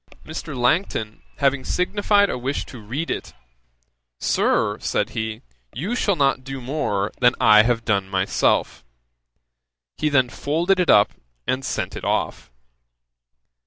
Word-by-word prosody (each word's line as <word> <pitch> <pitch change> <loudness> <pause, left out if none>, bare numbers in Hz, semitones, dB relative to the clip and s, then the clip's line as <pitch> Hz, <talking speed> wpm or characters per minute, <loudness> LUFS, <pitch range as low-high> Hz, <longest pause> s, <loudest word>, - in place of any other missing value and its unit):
Mr. 155 -2 -6
Langton 125 - 0 0.2
having 140 -2 +1
signified 205 +2 +2
a - - -3
wish 130 +3 -3
to 125 - -11
read 130 +11 -4
it, - - -5 0.9
'Sir, - - +1
(said - - -1
he) 110 -1 -4 0.3
you 185 - -2
shall 200 -5 +1
not 140 -3 +1
do 135 0 -6
more 120 -7 -2
than 125 0 +4
I 105 0 +7
have 115 0 0
done 100 -3 0
myself.' 95 -8 +1 1.1
He 155 - +1
then 130 -4 +3
folded 170 +9 0
it 180 - +1
up 105 - +6 0.3
and 130 +1 -1
sent - - -3
it - - -7
off. - - -2
130 Hz, 135 wpm, -22 LUFS, 110-155 Hz, 1.1 s, I